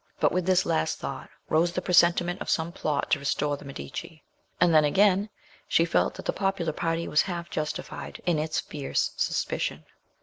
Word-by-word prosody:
But - - +3
with 180 0 -1
this 185 0 +4
last 80 - 0
thought - - -6 0.2
rose 170 +2 +2
the 180 - -1
presentiment 175 0 +3
of - - -4
some 160 +1 0
plot 150 -4 -2
to 155 - +3
restore 145 +1 0
the 140 - -12
Medici; 155 +4 -8 0.4
and 175 -2 +4
then 155 -1 +6
again 195 +6 +3 0.4
she 165 - +3
felt 170 - +1
that - - -9
the - - 0
popular 195 -5 -1
party 165 +1 -1
was 150 - +4
half 175 -3 -5
justified 155 +3 -4
in 170 -4 +2
its 155 +1 -1
fierce 145 -2 -2
suspicion. - - -1
170 Hz, 180 wpm, -27 LUFS, 155-180 Hz, 0.4 s, then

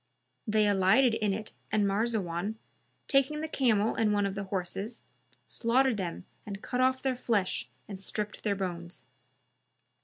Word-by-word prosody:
They 215 -1 +3
alighted 205 +6 +4
in 215 -2 +1
it 215 +2 -3 0.2
and 210 -1 +3
Marzawan, 200 -2 0 0.5
taking 275 +2 +2
the 315 - -2
camel 230 -7 +2
and 220 -2 +2
one 205 -1 +2
of 195 - -1
the 200 0 -4
horses, 195 +4 -4 0.4
slaughtered 250 0 +2
them 180 -2 -4 0.2
and 200 0 -7
cut 250 0 -1
off 260 0 +2
their 265 -1 +1
flesh 200 - 0 0.2
and 195 -2 -7
stripped 210 +2 -4
their 205 -2 0
bones. 175 -2 -5
210 Hz, 150 wpm, -30 LUFS, 195-235 Hz, 0.5 s, alighted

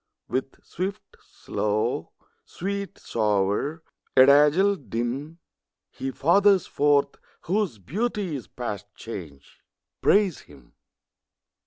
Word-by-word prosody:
With 135 +1 -4
swift, 200 +3 -5
slow; 105 -2 -2 0.3
sweet, 200 +1 -5
sour; 105 - 0 0.3
adazzle, 150 +9 +6
dim; 130 - -3 0.5
He 135 - -4
fathers 185 +7 +4
forth 145 -1 +2 0.2
whose 190 - -1
beauty 190 - -2
is 130 - -7
past 105 -5 -5
change: 80 -11 -9 0.4
Praise 200 -5 +3
him. 70 -4 -18
140 Hz, 85 wpm, -25 LUFS, -, 0.5 s, adazzle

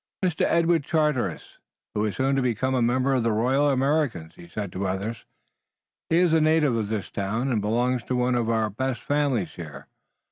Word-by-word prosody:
"Master 180 -3 +1
Edward 165 -2 +2
Charteris,[A] 150 - -1 0.3
who 105 +1 0
is 105 -3 -2
soon 135 +3 +1
to 135 - +1
become 125 +1 0
a 130 - +1
member 130 +3 +2
of 130 - +2
the 115 0 +1
Royal 130 +7 +2
Americans," 135 - 0
he 85 - -14
said 100 +1 -5
to 90 - -7
the 100 - -1
others. 100 +5 -3 0.8
"He 165 - +3
is 175 -2 +3
a 160 - +4
native 155 -4 +3
of 110 -2 -1
this 105 -2 -4
town 110 +7 -2
and 110 -4 +1
belongs 120 +4 0
to 130 - -2
one 125 0 +1
of 120 -2 0
our 110 -2 +1
best 130 +2 -3
families 145 -9 0
here. 75 -5 -9
125 Hz, 205 wpm, -25 LUFS, 105-140 Hz, 0.8 s, a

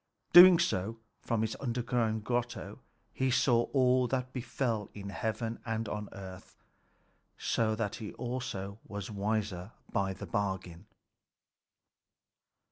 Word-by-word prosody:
Doing 180 0 +11
so, 105 - 0 0.2
from 115 -2 0
his 110 - -2
underground 120 -3 -1
grotto 120 +1 -3 0.3
he 130 0 0
saw 120 -1 +3
all 130 -2 +3
that 130 0 -2
befell 115 -4 -2
in 100 -1 -6
heaven 110 +2 -3
and 115 -1 -2
on 105 0 -4
earth. 95 -2 -10 0.8
So 110 -1 +1
that 110 -2 -2
he 110 -3 -6
also 115 -5 -4
was 100 0 -6
wiser 105 -1 -2 0.2
by 95 -1 0
the - - -8
bargain. 95 -2 -3
110 Hz, 120 wpm, -31 LUFS, 100-120 Hz, 0.8 s, Doing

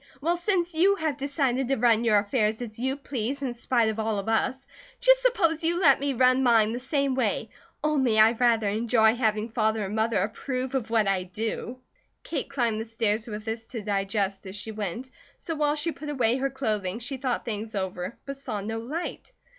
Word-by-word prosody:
Well, 335 +5 +1
since 350 -1 0
you 375 +5 +4
have 315 -6 -1
decided 275 -2 0
to 270 - +2
run 230 -1 +3
your 220 -3 +4
affairs 210 +1 +1
as 225 -3 -7
you 265 +2 0
please, 275 -1 -4
in 255 -3 -2
spite 240 -1 +1
of 220 0 -3
all 220 -1 0
of 200 - -4
us, 250 +4 0 0.3
just - - +5
suppose 340 -11 +2
you 340 +2 +1
let 285 -7 +5
me 280 0 0
run 255 +1 +4
mine 225 -3 +4
the 240 - -3
same 275 +1 0
way. 255 - -1 0.3
Only, 270 -7 +2
I 220 +1 +7
rather 230 -2 +2
enjoy 220 +1 +3
having 220 -2 0
Father 220 -2 0
and 200 +2 -4
Mother 220 0 +1
approve 255 +4 -3
of 260 -5 -1
what 225 -3 +2
I 195 -1 +2
do." 220 +6 -4 0.5
Kate 290 -5 -3
climbed 235 -5 0
the - - -5
stairs 225 0 -1
with 210 -1 -6
this 225 0 -4
to 230 -4 -6
digest 195 -1 -1
as 190 - -7
she 215 +2 -5
went; 215 +5 -5 0.3
so 330 - -4
while 300 -1 +1
she 305 +2 0
put 300 -1 -8
away 250 -4 +1
her 275 +1 0
clothing 215 -8 -2
she 245 +3 -5
thought 255 -2 -2
things 220 -1 -4
over, 190 +1 -3
but 275 0 -5
saw 255 -7 -4
no 220 +3 -4
light. 305 - -5
235 Hz, 205 wpm, -26 LUFS, 215-275 Hz, 0.5 s, I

